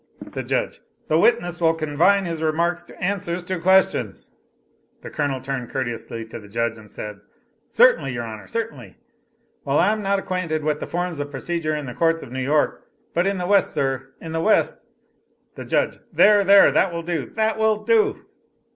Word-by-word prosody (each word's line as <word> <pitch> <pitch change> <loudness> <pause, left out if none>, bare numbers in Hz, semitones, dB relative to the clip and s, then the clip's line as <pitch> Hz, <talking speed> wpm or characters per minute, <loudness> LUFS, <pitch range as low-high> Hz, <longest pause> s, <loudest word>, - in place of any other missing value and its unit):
The - - -3
Judge. - - -2 0.3
"The 155 - +3
witness 175 -5 +2
will 165 -1 +3
confine 165 +6 +2
his 165 -2 -4
remarks 170 +3 0
to - - -15
answers 180 -2 -2
to 185 0 -3
questions." 190 +2 +2 0.7
The - - -9
Colonel 140 -3 -1
turned 130 -2 -5
courteously 115 -3 -4
to 115 - -9
the 105 - -14
Judge 115 +2 -2
and 105 -1 -15
said, 105 -1 -7 0.5
"Certainly, 485 - +4
your 120 -1 -3
Honor 110 -2 -8
certainly. 230 -1 -5 0.7
I 165 +8 +3
am 215 0 -2
not 195 - -3
well - - +3
acquainted 165 -4 -2
with 150 0 0
the - - -5
forms 175 -2 -3
of 145 0 -3
procedure 160 0 -2
in 150 -1 -4
the 125 - -6
courts 165 +3 +1
of - - -11
New 130 +1 -3
York, 145 +3 +1 0.3
but 175 +3 +1
in 195 0 0
the 180 - -3
West, 200 +1 +3
sir, 135 -1 -1
in 165 - -8
the 160 0 -1
West 215 +5 +2 0.4
" - - -44
The - - -8
Judge. - - 0
"There, 205 -1 +5
there, 200 +1 +7
that 190 - +2
will 170 0 -4
do, 165 -5 -3
that 220 0 0
will 215 -1 +2
do!" 225 -1 +2
165 Hz, 190 wpm, -22 LUFS, 135-190 Hz, 0.7 s, there